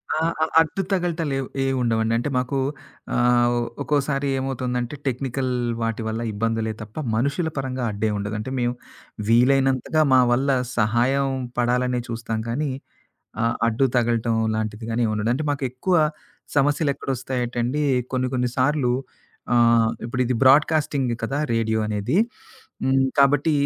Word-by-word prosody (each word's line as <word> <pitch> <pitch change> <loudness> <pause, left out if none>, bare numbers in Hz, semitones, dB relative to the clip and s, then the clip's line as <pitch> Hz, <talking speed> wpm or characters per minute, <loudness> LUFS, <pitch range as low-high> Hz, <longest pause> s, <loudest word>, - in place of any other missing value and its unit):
ఆ! - - 0 0.2
ఆ! - - +4 0.2
అడ్డుతగలటలు 170 -4 -1
ఏ 135 0 -3
ఏం 135 - 0
ఉండవండి. 115 -1 +1
అంటే 120 +5 -2
మాకు 130 +2 -1 0.6
ఆహ్, 120 0 +4
ఒ - - +1 0.2
ఒక్కోసారి 140 0 0
ఏమవుతుందంటే 125 -1 -2
టెక్నికల్ 130 0 -2 0.3
వాటి 115 0 -1
వల్ల 110 +1 -3
ఇబ్బందులే 110 +1 -1
తప్ప 105 0 -10 0.2
మనుషుల 140 +8 0
పరంగా 130 -2 -3
అడ్డే 105 +2 -1
ఉండదు. 100 +2 -3
అంటే 110 +5 -5
మేము 120 0 0 0.6
వీలైనంతగా 135 +5 +3
మా 130 - +7
వల్ల 135 +3 +2 0.3
సహాయం 120 +5 +2 0.3
పడాలనే 125 +1 +1
చూస్తాం 115 -1 -3
కానీ 145 +4 -1 0.7
ఆ! - - +2 0.2
అడ్డు 120 +4 +2
తగలటం 115 -1 +1 0.2
లాంటిది 110 0 -3
గాని 115 +2 0
ఏమిండదు. 110 +1 -1
అంటే 155 +4 -2
మాకెక్కువ 135 +6 -2 0.6
సమస్యలు 145 +1 +2
ఎక్కడ - - -11
వస్తాయటండి 125 +2 -2 0.3
కొన్ని 130 0 0
కొన్ని 125 -1 +1
సార్లు 130 -1 +2 0.6
ఆహ్, 115 -1 +4
ఇప్పుడు 125 +2 -3
ఇది 125 - 0
బ్రాడ్‌కాస్టింగ్‌ 140 -1 +3
కదా 135 +5 -2 0.2
రేడియో 110 -1 +1
అనేది. 105 - -1 0.7
హ్మ్. 135 0 +3 0.2
కాబట్టి 140 +3 +4
125 Hz, 135 wpm, -23 LUFS, 115-135 Hz, 0.7 s, మా